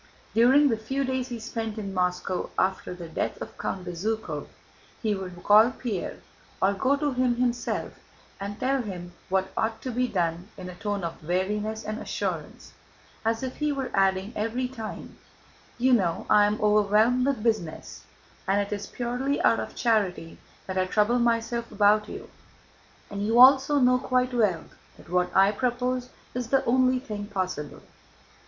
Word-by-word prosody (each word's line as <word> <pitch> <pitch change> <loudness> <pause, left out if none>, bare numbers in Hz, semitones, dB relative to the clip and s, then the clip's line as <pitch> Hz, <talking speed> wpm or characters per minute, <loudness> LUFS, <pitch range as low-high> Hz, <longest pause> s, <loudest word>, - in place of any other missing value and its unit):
During 265 +5 +5
the 225 - +1
few 265 +6 -2
days 260 -1 -1
he 240 -3 -6
spent 225 -1 -4
in 200 -3 -5
Moscow 180 0 -1
after 185 -1 0
the 175 -2 -8
death 160 - -3
of - - -8
Count 185 -1 -3
Bezúkhov, 215 +6 -3 0.5
he 215 -2 0
would 180 -3 -7
call 215 +3 +7
Pierre, 235 -7 -5 0.4
or 195 +1 +3
go 265 +7 +2
to 290 -1 -1
him 250 -1 +2
himself, 240 -1 -2 0.4
and 200 +1 -6
tell 270 +1 +1
him 180 -5 -7 0.2
what 190 0 0
ought 220 0 -1
to 255 - -3
be 250 +1 0
done 175 -3 -1
in 185 -1 -7
a - - -7
tone 205 +1 -3
of 165 -1 -5
weariness 210 +6 -1
and 215 +1 -4
assurance, - - -4 0.5
as 225 +2 0
if 260 -1 -4
he 300 -1 0
were 270 -2 -3
adding 195 +2 +1
every 230 +4 -1
time: 225 -4 -8 0.6
"You 255 +1 +3
know 180 -8 +1
I 205 0 +7
am 210 +1 -1
overwhelmed 215 +4 +3
with 270 -6 -1
business 215 -9 -2 0.4
and 195 +1 +3
it 205 +1 -2
is 205 -1 -5
purely 250 +3 -2
out - - +4
of - - -6
charity 200 -8 0 0.3
that 190 0 -2
I 185 - +1
trouble 215 +5 +2
myself 235 0 0
about 210 +1 +3
you, - - -9 0.8
and 200 0 -3
you 225 +3 +2
also 270 +3 +7
know 250 -2 +4
quite 255 0 0
well 205 -9 +2 0.3
that - - -16
what 180 0 +2
I 195 +1 +6
propose 250 +2 -1 0.2
is 250 -1 -3
the 270 +2 +2
only 255 +1 +3
thing 210 -5 -6
possible." 185 -7 -4
220 Hz, 170 wpm, -26 LUFS, 195-250 Hz, 0.8 s, call